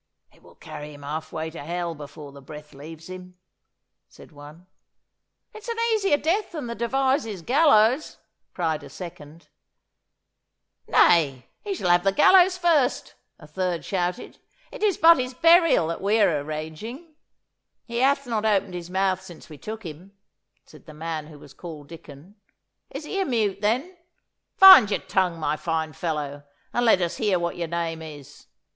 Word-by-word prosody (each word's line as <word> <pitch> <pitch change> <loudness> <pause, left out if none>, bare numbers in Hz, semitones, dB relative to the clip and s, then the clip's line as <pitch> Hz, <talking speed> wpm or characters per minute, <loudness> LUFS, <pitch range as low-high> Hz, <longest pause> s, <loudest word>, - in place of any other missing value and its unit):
'It - - -25
will - - -19
carry 150 0 -10
him 145 - -14
half 155 +2 -6
way 160 0 -5
to 165 - -9
hell 170 +2 -4
before 145 -1 -11
the 140 0 -14
breath 150 +2 -12
leaves 155 +3 -11
him,' 185 0 -11 0.7
said - - -17
one. 150 +4 -14 0.9
'It's 435 +2 -12
an 465 -1 -4 0.2
easier 395 -8 +2
death 350 +8 -1
than 305 -6 -5
the 235 - -5
Devizes 235 - -1
gallows!' 260 - +3 0.4
cried 160 -4 -1
a - - -11
second. 155 0 -11 1.4
'Nay, 140 -7 +3 0.2
he 405 -2 -3
shall 180 - 0
have 175 0 +3
the 195 - +2
gallows 365 - +5
first!' 330 -7 +1 0.2
a 150 - -15
third 175 +2 -3
shouted. 180 +3 -3 0.3
'It - - -10
is 415 -5 +1
but 330 -2 +6
his 255 0 -4
burial 330 - +5
that 165 - -5
we 205 +3 +1
are 180 -8 +3
arranging.' 160 - -7 0.7
'He 235 0 -4
hath 275 +2 +2
not 225 -3 -2
opened 200 -3 +1
his 175 -1 -7
mouth 190 0 0
since 175 -4 -14
we 155 - -11
took 220 -1 -8
him,' 175 +5 -11 0.5
said - - -18
the 155 - -12
man 160 -1 -5
who 155 -1 -13
was 140 - -15
called 155 -5 -10
Dicon. 160 +2 -13 0.6
'Is 285 +3 -8
he 390 +5 -3
a - - 0
mute, 210 -6 -1
then? 255 - -1 0.6
Find 380 - +9
your 205 - -1
tongue, 180 -3 -1
my 150 -1 -1
fine 160 -2 -3
fellow, 145 -2 -4 0.3
and 240 0 +1
let 190 -4 +4
us 170 - -3
hear 205 -4 +1
what 170 0 -3
your 170 -1 -4
name 165 -1 -3
is. 150 -4 -12
180 Hz, 170 wpm, -24 LUFS, 155-245 Hz, 1.4 s, Find